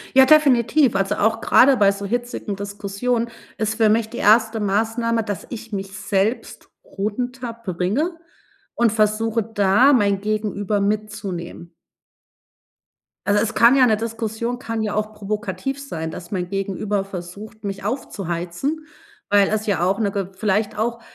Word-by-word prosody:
Ja, 265 0 +9
definitiv, 275 -4 +4
also 195 +1 0
auch 225 +2 +1
grade 265 +3 +5
bei 200 -4 +4
so 200 0 -6
hitzigen 240 -3 -3
Diskussionen 205 +4 -2 0.3
ist 220 0 0
für 220 -1 +4
mich 220 +1 +2
die 235 - -9
1. 220 +1 +4
Maßnahme, 225 +3 0
dass 205 -3 -5
ich 230 -2 -8
mich 195 -1 -4
selbst 205 +3 -2 0.2
runterbringe 230 - -3 0.6
und 235 -2 +2
versuche, 225 +1 +1
da 215 +5 +4
mein 200 -6 +3
Gegenüber 210 -1 -1
mitzunehmen. 200 -5 -4 1.5
Also 205 0 +3
es 230 +1 -2
kann 235 +3 +6
ja 255 -2 +6
'ne 215 -2 +3
Diskussion 225 +1 -3
kann 230 -3 -3
ja 210 -1 -2
auch 215 0 -2
provokativ 210 +5 -4
sein, 160 -12 -5
dass 170 0 -9
mein 180 -3 -2
Gegenüber 195 +1 -2
versucht, 195 +4 -9
mich 195 -1 -5
aufzuheizen, 205 - -3 0.4
weil 200 -1 +4
es 215 0 -1
ja 200 -5 0
auch 195 +3 +1
'ne 205 -3 +1
ge 195 -2 -3
vielleicht 210 +1 -1
auch 235 +2 -1
215 Hz, 145 wpm, -21 LUFS, 200-230 Hz, 1.5 s, Ja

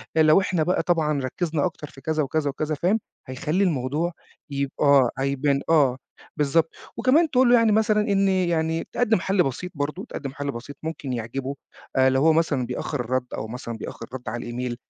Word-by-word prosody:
لو 155 +3 +6
إحنا 180 -4 0
بقى 180 +4 +1
طبعًا 155 -4 +1
ركّزنا 155 +4 -1
أكتر 155 -4 -4
في 135 - -15
كذا 155 +1 0
وكذا 145 +1 -1
وكذا 155 +2 -2
فاهم، 185 +9 +1 0.3
هيخلّي 155 +8 -1
الموضوع 155 0 0 0.4
يب 140 -1 -2
آه 140 -4 +5
هيبان 140 +1 +1
آه، 140 -6 +4 0.4
بالضبط، 155 +3 +1 0.2
وكمان 280 +7 +4
تقول 255 -2 +4
له 245 - +7
يعني 230 -2 +4
مثلًا 215 0 +3
إن 200 -2 +2
يعني 165 -3 0
تقدِّم 225 -4 +2
حَل 195 0 +2
بسيط 140 +7 -4
برضه، 145 +1 -3
تقدِّم 135 -2 -5
حَل 145 0 -3
بسيط 125 +4 -8
ممكن 155 -5 -4
يعجبه، 130 +4 -4 0.4
أ 130 0 +5
لو 130 0 +2
هو 160 +2 +5
مثلًا 155 -6 +1
بيأخّر 130 +3 -4
الرَّد 125 +1 -1
أو 110 - -4
مثلًا 115 0 -6
بيأخّر 115 - -7
رَد 125 -3 -5
على 120 +1 -5
الemail 125 0 -3
150 Hz, 185 wpm, -24 LUFS, 130-175 Hz, 0.4 s, له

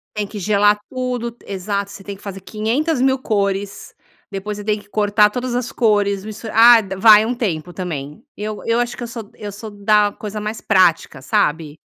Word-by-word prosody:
Tem 210 -1 -1
que 210 +1 -8
gelar 205 +1 +3
tudo, 250 -2 -3
t 235 - -23
exato. 200 +1 -3
Você 195 - -11
tem 200 0 -7
que 195 - -18
fazer 195 -1 -7
500.000 265 - 0
cores. 200 -4 -2 0.4
Depois 205 +1 -5
você 205 - -7
tem 210 0 0
que 205 - -18
cortar 210 0 +3
todas 250 +2 -3
as 245 -1 -2
cores, 205 -3 +1
mistur 215 +1 -7
ah, 235 +2 +8 0.2
vai 215 +1 +7
um 240 - -1
tempo 180 -9 -3
também. 165 -1 -6
Eu 210 0 -5
eu 230 +1 +1
acho 240 0 -2
que - - -6
eu - - -4
sou 230 -3 -8
eu 205 -1 -7
sou 210 +2 -8
da 205 0 +2
coisa 210 +1 -7
mais 215 +1 -4
prática, 175 -7 +2
sabe. 150 +2 0
210 Hz, 195 wpm, -19 LUFS, 200-230 Hz, 0.4 s, ah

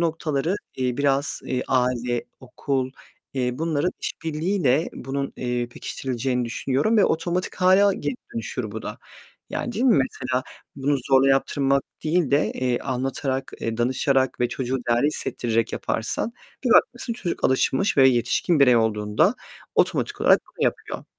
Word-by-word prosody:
noktaları, 165 0 0 0.2
eee, 125 -2 -1
biraz 140 +1 +1 0.3
aile, 125 -2 +1 0.2
okul, 130 0 -2 0.4
eee, 125 -2 -1
bunların 160 +1 0
iş - - -2
birliğiyle 160 -2 +1
bunun, 140 +1 -4
eee, 120 -1 -2
pekiştirileceğini 125 0 -3
düşünüyorum 135 - 0
ve 205 - +6
otomatik 175 +3 -1
hâle 190 +2 +5
geri 145 -5 -3 0.2
dönüşür 115 0 -4
bu 110 +1 -6
da, 105 - -6 0.5
yani, - - -3
değil 235 +5 -1
mi? 245 -5 +5
Mesela, 130 0 -2 0.3
bunu 140 +1 +1
zorla 135 0 +5
yaptırmak 135 0 +2 0.2
değil 160 -2 +1
de, 145 +2 +2
eee, 125 -1 0
anlatarak, 130 +1 -2
eee, 115 0 -2
danışarak 130 +2 +1
ve 120 - +2
çocuğu 130 +1 -2
değerli 120 +4 +3
hissettirerek 115 -6 -1
yaparsan 120 - -2 0.3
bir 250 - +1
bakmışsın, 240 +1 +3
çocuk 185 -7 -4
alışmış 130 +7 +2
ve 135 -1 +7
yetişkin 125 +6 +1
birey 125 -3 +6
olduğunda 105 -2 +2 0.4
otomatik - - +1
olarak - - +5 0.2
bunu - - +1
yapıyor. - - -2
135 Hz, 140 wpm, -24 LUFS, 125-155 Hz, 0.5 s, ve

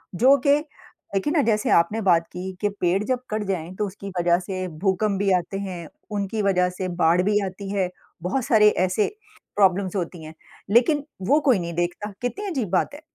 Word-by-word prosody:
जो 265 +7 +6
कि 285 +1 +6 0.6
देखिए 295 - 0
ना 310 - +4
जैसे 215 0 0
आपने 210 +7 +3
बात 170 -4 +3
की 185 +1 -5
कि 205 - +2
पेड़ 180 +3 +2
जब 255 +2 -1
कट 215 0 -1
जाएँ 175 -1 -3
तो 210 - -1
उसकी 195 +1 -8
वज़ह 175 0 +3
से 185 0 -4
भूकंप 195 +1 +1
भी 195 -1 +2
आते 180 +3 -5
हैं, 180 -5 -6 0.2
उनकी 205 +1 -2
वज़ह 180 -3 +2
से 185 - -2 0.2
बाढ़ 170 +3 +4
भी 210 +1 +2
आती 190 +1 -7
है। 190 -3 0 0.3
बहुत 235 +7 -1
सारे 210 -2 +6 0.2
ऐसे 200 +3 +1 0.5
प्रॉब्लम्स 195 -1 +2
होती 175 -3 -4
हैं। 155 +1 -9 0.4
लेकिन 280 +6 +4 0.2
वो 295 +2 +5
कोई 225 -7 +5
नहीं 170 -1 -4
देखता। 175 +4 -2
कितनी 390 +12 -3
अज़ीब 250 - -2
बात 190 - +1
है। 300 - -11
195 Hz, 195 wpm, -23 LUFS, 180-215 Hz, 0.6 s, जो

